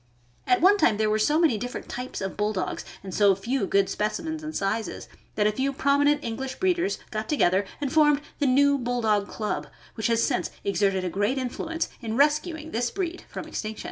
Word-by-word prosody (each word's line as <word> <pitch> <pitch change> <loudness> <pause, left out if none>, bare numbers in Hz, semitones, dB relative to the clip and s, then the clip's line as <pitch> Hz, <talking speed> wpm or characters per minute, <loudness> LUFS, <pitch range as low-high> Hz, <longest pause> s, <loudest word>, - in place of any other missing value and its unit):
At 370 -2 +3
one 390 +4 +6
time 215 - +4
there 215 0 +1
were 215 - +2
so 295 +8 +3
many 315 -10 +3
different 245 +3 -5
types 250 -2 -5
of 195 0 -3
Bull 210 +1 0
dogs, 185 - -3 0.2
and 190 -2 -7
so 200 -1 +4
few 230 +3 -1
good 195 -1 +3
specimens 315 +9 -2
and 310 0 -6
sizes, 210 +3 -2 0.3
that 210 - +2
a 210 - +4
few 265 +5 -1
prom 280 +1 +2
inent 290 +1 +3
English 260 +3 -4
breeders 370 +1 +1
got 215 0 -4
together 195 - +3
and 280 -2 -2
formed 295 -2 +4 0.2
the 290 - +2
New 280 +2 +4
Bulldog 225 -5 +1
Club, 215 -1 -3 0.3
which 220 - -1
has 230 0 +2
since 250 - 0
exerted 195 -1 +1
a - - 0
great 205 +8 0
influence 320 +6 -2
in 225 -1 -3
rescuing 305 +2 +1
this 240 +1 0
breed 360 0 -4
from - - -6
extinction. 215 0 -5
245 Hz, 205 wpm, -26 LUFS, 210-295 Hz, 0.3 s, one